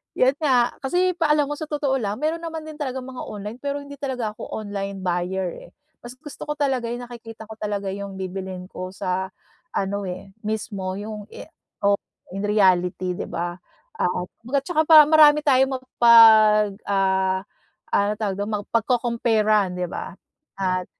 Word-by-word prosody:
'yon 260 +2 +3
nga 255 -6 +2
kasi 360 +5 0
pa 310 -3 +3
alam 295 -1 +1
mo 295 - -3
sa 310 - -4
totoo 290 -3 0
lang, 210 -3 -3
meron 320 +2 -1
naman 325 -1 -5
din 305 -1 -9
talagang 260 -3 -4
mga 260 -1 -7
online, 210 +3 -7
pero 285 +1 -3
hindi 285 0 -10
talaga 255 -5 -3
ako - - -7
online 200 -2 -4
buyer, 180 +1 -1 0.2
eh. - - -33 0.3
Mas 240 - -8
gusto 295 0 -9
ko 300 - -2
talaga 265 -4 0
'yong 240 +1 -4
nakikita 225 -2 -10
ko 220 - -9
talaga 205 -2 -3
'yong 200 0 -5
bibilhin 185 -1 -6
ko 185 -1 -7
sa 190 +1 -2 0.5
ano, 200 +1 -1
eh, 185 +2 -7 0.2
mismo 200 -3 -3
'yong, 210 0 -6
eh, - - -9 0.4
oh, 200 0 +4 0.4
in 195 - -3
reality, 185 -3 +2
'di - - -4
ba? 175 +1 -3 0.4
At 180 - +1 0.3
kumbaga 255 +5 -1
'tsaka 315 -3 +2
para 310 -2 +9
marami 300 -1 +7
tayong 265 -1 +4
mapag 220 -4 +6
ah, 190 -1 +1 0.5
ano 200 +1 +3
tawag 200 -3 -1
do'n? 205 +2 -2
Mapagco-compare-an, 225 -4 +1
'di 180 -1 -2
ba? - - -6 0.5
At 185 -1 0
215 Hz, 170 wpm, -23 LUFS, 195-265 Hz, 0.5 s, para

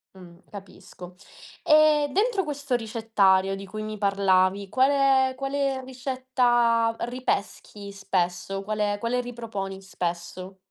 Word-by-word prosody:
Mh, 175 -2 -14
capisco. 185 -2 -12 0.5
E 305 -1 +5
dentro 415 0 +1
questo 285 -4 -3
ricettario, 210 -4 +1
di 195 0 -8
cui 215 +3 -7
mi 215 0 -5
parlavi, 195 -1 +2
quale 265 +1 +3
quale 275 -1 -1
ricetta 245 -3 +1
ripeschi 215 -4 -4
spesso? 195 0 -2
Quale 210 0 -1
quale 245 +2 -1
riproponi 220 -6 -6
spesso? 185 +1 -5
215 Hz, 105 wpm, -25 LUFS, 195-260 Hz, 0.5 s, E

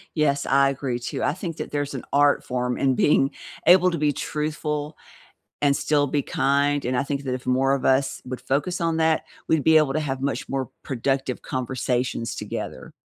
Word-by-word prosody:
Yes, 145 -3 +1
I 140 0 +4
agree 135 -3 -3
too. 120 - -4
I 145 - +1
think 170 -2 -6
that - - -5
there's 145 -1 -2
an 130 - -5
art 145 0 +4
form 125 0 -2
in 135 -1 +2
being 135 0 +3 0.3
able 180 +1 +7
to 170 - -2
be 150 0 +2
truthful 150 +1 -3 0.6
and 140 -1 +3
still 145 0 +1
be 145 +1 0
kind, 140 +1 +1
and 125 +1 -1
I 135 - +1
think 140 0 -3
that 130 -2 -2
if 125 0 -5
more 135 +2 +3
of 140 - -1
us 135 +1 +2
would 125 0 -6
focus 145 +8 -1
on 165 -1 +1
that, 160 -1 +2 0.2
we'd 160 -3 +2
be 160 +2 +6
able 150 -3 +3
to 155 - +1
have 135 -3 -3
much 140 0 -2
more 135 -3 -2
productive 135 0 -1
conversations 125 -2 -2
together. 65 - -6
140 Hz, 200 wpm, -24 LUFS, 130-150 Hz, 0.6 s, able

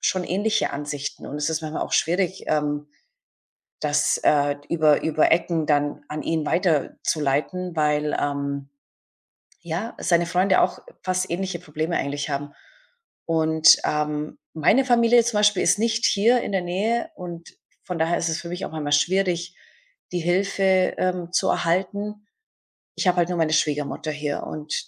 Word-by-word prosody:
schon 185 -1 0
ähnliche 205 +4 0
Ansichten 145 0 -5
und 145 - -7
es 150 +2 -1
ist 160 0 -1
manchmal 155 0 -3
auch - - -6
schwierig, 185 +3 0
ähm, 150 -1 -1 0.9
das, 150 -1 +1
äh, 145 -1 +3
über 155 -3 +3
über 155 -1 +2
Ecken 165 -1 +1
dann 145 -1 0
an 150 0 -5
ihn 160 -2 -1
weiterzuleiten, 160 0 0
weil, 150 -1 +1
ähm, 140 -1 -3 0.9
ja, 175 +7 -4
seine 170 -1 +2
Freunde 185 +2 +3
auch - - +1 0.2
fast 185 -1 -1
ähnliche 185 0 -2
Probleme 160 +1 -3
eigentlich 145 +1 -2
haben. 145 +1 -3 0.7
Und, 160 -1 +5
ähm, 150 0 -2 0.2
meine 210 - +3
Familie 235 -1 +4
zum 235 -3 0
Beispiel 210 -3 +3
ist 185 +4 +3
nicht 230 +1 0
hier 230 +4 +3
in - - -4
der 190 -2 +1
Nähe, 220 - -1
und 170 -1 -8 0.4
von 180 -3 -4
daher 165 +2 +1
ist 170 - -1
es 160 - -2
für 170 - -8
mich 180 +1 -4
auch - - -7
manchmal 150 -2 -3
schwierig, 180 +2 +1 0.6
die 175 - 0
Hilfe, 190 +1 +2
ähm, 180 -2 -1
zu - - +2
erhalten. 200 +4 -1 0.7
Ich - - -1
habe 180 0 +3
halt 175 0 +2
nur 175 - -2
meine 160 -1 +1
Schwiegermutter 150 0 -1
hier 150 -1 -3
und 155 0 -6
170 Hz, 155 wpm, -23 LUFS, 150-185 Hz, 0.9 s, Und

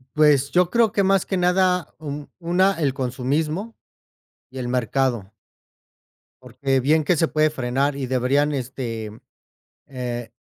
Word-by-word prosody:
pues 145 -3 +4
yo 180 0 +3
creo 230 -1 +3
que 205 - +1
más 195 0 +2
que 190 - -2
nada 180 -1 +1
un 145 -1 -7
una 180 +2 +1
el 140 -5 +1
consumismo 145 - -2 0.8
y 130 - -7
el 120 - -3
mercado. 125 -4 -1 1.1
Porque 135 -1 -1
bien 155 +3 +2
que 180 - +3
se 165 +1 +1
puede 155 0 +2
frenar 135 +1 -1
y 135 -2 -3
deberían 135 +4 +1
este, 120 -5 -4 0.8
eh, 120 -4 -5
145 Hz, 140 wpm, -22 LUFS, 130-170 Hz, 1.1 s, pues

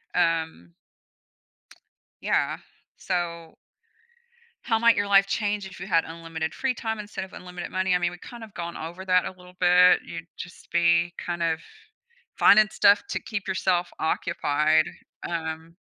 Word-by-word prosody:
um 160 - 0 1.5
Yeah, - - 0 0.4
so 170 -3 -3 1.1
How 225 -2 +1
might 235 -1 +5
your 205 0 +1
life 195 0 +5
change 205 -1 -1
if 190 - -11
you - - -6
had 165 -4 +2
unlimited 165 -1 -5
free 265 -2 -1
time 225 -2 -3
instead 205 -2 -6
of 190 - -15
unlimited 180 -1 -8
money? 185 0 +1
I - - +3
mean, 175 0 0
we've 175 0 -12
kind 240 -2 -10
of 215 - -14
gone 170 0 -5
over 170 +4 -7
that 180 -1 +3
a - - -3
little 180 -1 -17
bit. 180 0 +6
You'd 165 0 -8
just 180 - -10
be 170 0 +3
kind 170 -1 -3
of 165 -1 +1 0.8
finding 215 +1 +7
stuff 200 +1 +4
to - - -2
keep 205 -4 -5
yourself 175 -1 +1
occupied, 155 -1 +1 0.4
um, 165 0 -5
175 Hz, 155 wpm, -25 LUFS, 165-195 Hz, 1.5 s, finding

